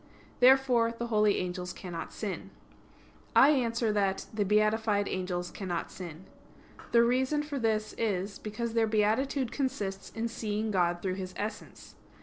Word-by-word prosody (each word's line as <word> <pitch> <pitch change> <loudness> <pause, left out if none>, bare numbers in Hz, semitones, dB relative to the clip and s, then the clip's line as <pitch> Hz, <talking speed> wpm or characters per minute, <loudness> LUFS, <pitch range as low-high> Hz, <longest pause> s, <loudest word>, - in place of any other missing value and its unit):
Therefore 250 -2 +5
the 235 +1 -4
holy 210 -1 +4
angels 180 0 -3
cannot 175 -3 -6
sin. - - -5 0.9
I 275 - +8
answer 230 -5 +1
that, 195 -2 0
The 215 -1 +1
beatified 210 0 +2
angels 180 -1 -3
cannot 180 -4 -4
sin. 175 -1 -9 0.7
The 235 0 +6
reason 260 +5 +1
for 290 -2 -4
this 215 -2 0
is, 200 -3 -1
because 225 +2 -4
their 225 -1 +3
beatitude 225 +5 +1
consists 210 -9 -3
in 225 +1 -3
seeing 220 -1 -2
God 175 -2 +1
through 185 -1 -1
His 185 -1 -7
essence. 210 +1 -6
215 Hz, 140 wpm, -30 LUFS, 190-235 Hz, 0.9 s, I